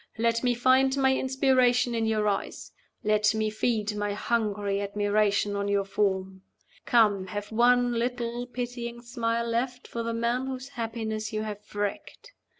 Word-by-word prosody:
Let 230 +1 +1
me 245 -1 +2
find 260 +2 +3
my 265 -1 +3
inspiration 255 -2 +2
in 225 -1 0
your 215 -1 +1
eyes. 200 -1 -3 0.3
Let 210 0 +3
me 215 0 0
feed 215 -1 -1
my 205 0 -1
hungry 205 -2 -1
admiration 205 0 +1
on 200 0 -1
your 200 -1 +1
form. 190 -2 -1 0.5
Come, 210 -6 +3
have 205 +2 -5
one 245 +2 +4
little 240 0 -2
pitying 240 -1 -5
smile 235 -1 -1
left 245 +2 -2
for 235 - -4
the 230 0 -2
man 240 +3 0
whose 260 0 -5
happiness 220 -3 -4
you 215 0 -2
have 210 -1 -5
wrecked. 205 - -4
230 Hz, 150 wpm, -27 LUFS, 210-245 Hz, 0.5 s, one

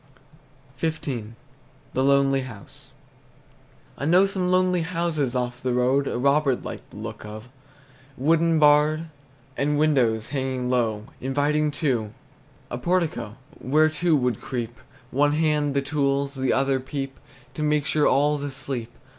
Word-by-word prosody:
XV. 160 +1 -2 0.9
THE 130 - +1
LONELY 135 0 +3
HOUSE. 115 -6 -11 1.1
I 140 - -2
know 180 +5 +5
some 190 -2 -1
lonely 185 -1 +3
houses 165 -6 -1
off 125 0 -2
the 125 -1 -1
road 130 +3 +2
A - - -2
robber 140 +1 +3
'd - - -12
like - - -7
the - - -13
look - - -7
of, 110 +3 -9 0.7
Wooden 165 +4 +3
barred, 150 +2 +4 0.5
And 145 +1 0
windows 125 -8 +2
hanging 130 -3 -2
low, 110 -4 0 0.2
Inviting 145 +3 +1 0.2
to 115 -7 0 0.6
A 120 - -3
portico, 170 - -1 0.2
Where 155 +4 +3
two 155 -1 +2
could 125 -4 -1
creep: 120 -3 -5 0.3
One 145 +2 +2
hand 150 -2 +1
the 140 - +1
tools, 140 -1 0
The 130 -1 0
other 135 0 +2
peep 135 0 -5 0.3
To 150 - -6
make 150 -1 +1
sure 150 0 +2
all's 145 +1 +2
asleep. 135 -4 -4
140 Hz, 140 wpm, -24 LUFS, 130-155 Hz, 1.1 s, know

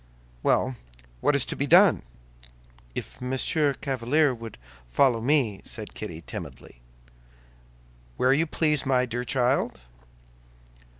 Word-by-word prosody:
"Well, 130 - +1 0.4
what 145 - +2
is 140 - +2
to - - -4
be 140 - -2
done?" 180 +4 +6 0.9
"If - - -7
Monsieur 135 +3 0
Chevalier 135 +2 +2
would 115 -2 -9 0.3
follow 120 - +3
me?" 125 -6 +1
said - - -6
Kitty, 80 +1 -7
timidly. - - -9 1.4
"Where 130 +1 +3
you 160 +4 +1
please, 150 -2 +1
my 130 -1 +2
dear 120 0 -3
child." 125 - 0
130 Hz, 115 wpm, -26 LUFS, 120-145 Hz, 1.4 s, done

